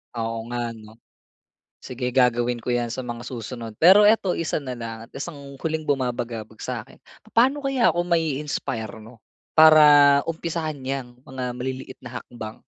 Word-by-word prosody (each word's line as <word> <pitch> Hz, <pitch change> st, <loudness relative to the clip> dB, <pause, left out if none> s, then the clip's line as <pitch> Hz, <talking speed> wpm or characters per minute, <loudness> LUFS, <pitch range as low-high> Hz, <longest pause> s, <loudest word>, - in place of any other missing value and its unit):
Oo 115 Hz, -1 st, -3 dB
nga 120 Hz, -1 st, -3 dB
ano? 110 Hz, +1 st, -15 dB, 0.8 s
Sige 125 Hz, 0 st, -4 dB
gagawin 125 Hz, -1 st, +2 dB
ko 120 Hz, +1 st, -3 dB
'yan 120 Hz, -1 st, 0 dB
sa 125 Hz, +2 st, -5 dB
mga 120 Hz, -1 st, -6 dB
susunod. 115 Hz, -2 st, -7 dB
Pero 190 Hz, +5 st, +7 dB
eto, 210 Hz, -3 st, +4 dB
isa 165 Hz, -, -2 dB
na 130 Hz, -4 st, -5 dB
lang 115 Hz, -2 st, -6 dB
at -, -, -29 dB
isang 145 Hz, +2 st, -6 dB, 0.2 s
huling 160 Hz, -1 st, -2 dB
bumabagabag 120 Hz, -5 st, -3 dB
sa'kin. 125 Hz, 0 st, -6 dB, 0.3 s
Paano 265 Hz, +6 st, +3 dB
kaya 270 Hz, -3 st, +2 dB
ako 175 Hz, -, +1 dB
mai-inspire 145 Hz, -8 st, -2 dB
'no, 110 Hz, +1 st, -14 dB, 0.3 s
para 155 Hz, -1 st, +8 dB, 0.4 s
umpisahan 160 Hz, -3 st, -4 dB
'yang 130 Hz, -1 st, -4 dB
mga 130 Hz, -1 st, -7 dB
maliliit 130 Hz, +1 st, -6 dB
na 125 Hz, -1 st, -7 dB
hakbang? 110 Hz, -3 st, -9 dB
125 Hz, 150 wpm, -23 LUFS, 120-155 Hz, 0.8 s, para